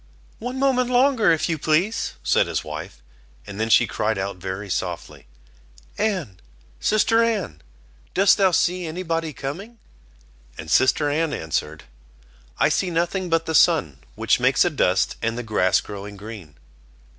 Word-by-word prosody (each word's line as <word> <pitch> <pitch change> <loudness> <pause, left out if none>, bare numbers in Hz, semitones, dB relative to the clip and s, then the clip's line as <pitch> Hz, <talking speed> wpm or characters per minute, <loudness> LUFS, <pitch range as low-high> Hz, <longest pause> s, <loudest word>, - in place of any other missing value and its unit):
"One 245 +3 -5
moment 260 -2 +1
longer, 250 -5 +3
if 160 - +1
you 160 -2 -2
please," 175 +10 0
said - - +2
his - - -2
wife, 60 0 -8 0.4
and 100 0 -9
then 110 +1 -1
she 120 - +5
cried 110 0 -2
out 95 0 -4
very 95 +3 -6
softly: 85 -7 -5 0.7
"Anne, 180 - -2 0.4
sister 225 +2 +2
Anne, 200 - -2 0.5
dost 195 +1 +5
thou 195 -1 +5
see 180 0 0
any 175 +4 -5
body 165 -2 -2
coming?" 170 - -7 0.8
And 80 0 -7
sister 130 - +3
Anne 155 +1 0
answered: 80 -1 -3 0.7
"I - - +3
see 190 - 0
nothing 175 +2 -1
but 165 0 +1
the 160 - -3
sun, 120 - +3 0.2
which - - +1
makes - - +3
a - - +1
dust, - - +1
and 115 0 -1
the 125 - -4
grass 100 -4 +2
growing 100 0 -9
green." 100 -8 -10
155 Hz, 155 wpm, -22 LUFS, -, 0.8 s, she